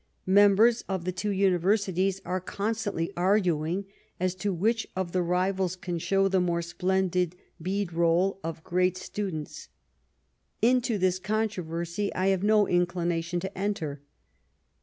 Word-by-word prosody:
Members 205 +4 +5
of 190 -3 -2
the 185 - 0
two 185 +3 -3
uni 190 -2 +2
versities 195 0 +1
are 185 +1 -2
constantly 200 -3 -2
arguing 180 -1 +1 0.3
as 185 0 0
to 190 +2 -2
which 220 +6 0
of 185 -2 -2
the 185 - +1
rivals 185 +1 0
can 175 -2 -4
show 195 +3 +2
the 190 -1 +2
more 170 -1 0
splendid 180 0 0 0.3
beadroU 180 0 +1
of 160 0 -5
great 180 +1 +1
students. 185 -6 -5 0.9
Into 245 -1 +2
this 185 -1 +1
controversy 190 -3 -2
I 185 +1 +2
have 190 -2 +1
no 210 0 +4
inclination 175 -1 0
to 190 +2 -6
enter. 175 -8 -3
185 Hz, 135 wpm, -27 LUFS, 175-200 Hz, 0.9 s, Members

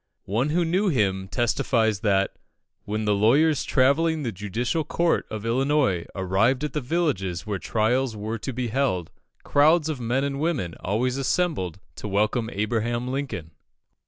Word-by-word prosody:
One 115 +9 0
who 170 +3 +1
knew 185 +5 +1
him 95 - +1
testifies 115 -2 +1
that, 100 -2 +1 0.5
when 105 +1 -2
the 105 - +3
lawyers 140 +10 +3
travelling 155 +4 +2
the 120 - -2
judicial 110 - -2
circuit 170 +2 +1
of 110 0 -6
Illinois 130 - +1
arrived 100 +8 +1
at 150 - -3
the 150 - -1
villages 120 - -1
where 105 -3 -3
trials 115 +4 0
were 110 +2 -4
to 130 - -4
be 125 -1 -3
held, 110 -9 0 0.3
crowds 155 +2 +4
of 150 -4 -3
men 120 +4 0
and 140 -1 -2
women 145 - -1
always 125 +7 -1
assembled 135 - -1 0.2
to - - -5
welcome 105 +3 0
Abraham 120 +4 -1
Lincoln. 130 - -4
120 Hz, 155 wpm, -25 LUFS, 105-140 Hz, 0.5 s, crowds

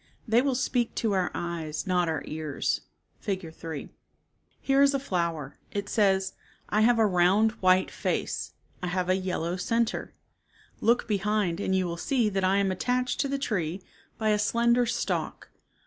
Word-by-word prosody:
They 230 +2 +4
will 270 -1 +1
speak 245 -2 0
to 225 - 0
our 185 -2 +1
eyes 165 -2 -3
not 180 -3 +1
our 160 - -2
ears 155 -2 -2 0.4
(Fig. 185 -5 -4
3). 160 -3 -7 0.7
Here 270 0 +3
is 280 0 +5
a - - +1
flower. 170 - -2
It 200 0 -3
says, 195 -3 +2 0.2
" - - -31
I 210 - +2
have 235 +2 +5
a 225 - +5
round 195 +3 +4
white 185 0 +4
face. - - -2 0.3
I 180 - -2
have 180 0 -1
a 185 - +4
yellow 180 -2 -2
center. 230 +5 -1 0.6
Look 235 +2 +2
behind 205 -3 0
and 190 -2 0
you 185 -1 +2
will 170 -1 -3
see 240 +3 +1
that 195 -1 -1
I 190 +1 +3
am 200 -1 +2
attached 250 +6 -1
to 280 - +2
the 275 0 -1
tree 185 - -2 0.3
by 220 -1 0
a 210 0 +3
slender 235 +3 +3
stalk. 240 +1 -2
195 Hz, 175 wpm, -27 LUFS, 180-230 Hz, 0.7 s, is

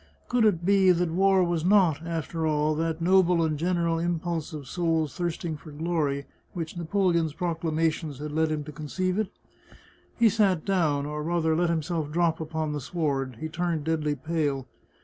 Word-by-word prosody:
Could 245 -2 +3
it 175 -5 +2
be 195 -1 +5
that 175 -1 +3
war 190 +2 +4
was 170 -2 0
not, 180 -6 +4
after 165 -1 -3
all, 150 0 +1
that 165 +1 -2
noble 180 -2 +4
and 155 -1 0
general 170 +1 0
impulse 170 -1 -2
of 150 -4 -7
souls 165 -4 0
thirsting 170 -3 -3
for 155 - -13
glory 150 -2 -1 0.3
which 165 -2 -5
Napoleon's 170 -2 +1
proclamations 160 -3 -1
had 150 +2 -5
led 160 +1 +1
him 150 -1 -2
to 150 - -8
con 150 +1 -8
ceive 185 +5 -1
it? 215 - 0 0.9
He 235 - +5
sat 195 -6 +2
down, 155 -8 +1
or 150 +1 -4
rather 160 0 +1
let 175 +1 +2
himself 160 -2 -1
drop 165 0 +1
upon 155 -1 -3
the 145 - -3
sward; 140 -4 -2
he 160 - -2
turned 165 -1 -2
deadly 155 -2 0
pale. 145 -3 -1
165 Hz, 175 wpm, -27 LUFS, 155-175 Hz, 0.9 s, be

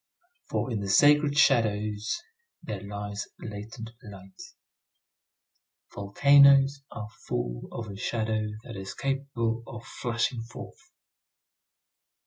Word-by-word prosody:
For 130 - -1
in 110 - -1
the 100 -1 -4
sacred 145 +6 +5
shadows 110 - +2 0.4
there 105 -3 -5
lies 100 0 -5
latent 110 +2 -7
light. 95 -4 -12 1.5
Volcanoes 140 +6 +5
are 105 -3 -6 0.2
full - - -3
of 115 -1 -5
a 100 -1 -8
shadow 110 0 -1 0.2
that 115 - -9
is 95 0 -6
capable 135 -4 -2
of 120 0 -9
flashing 120 0 -2
forth. 120 - -11
115 Hz, 105 wpm, -28 LUFS, 105-135 Hz, 1.5 s, sacred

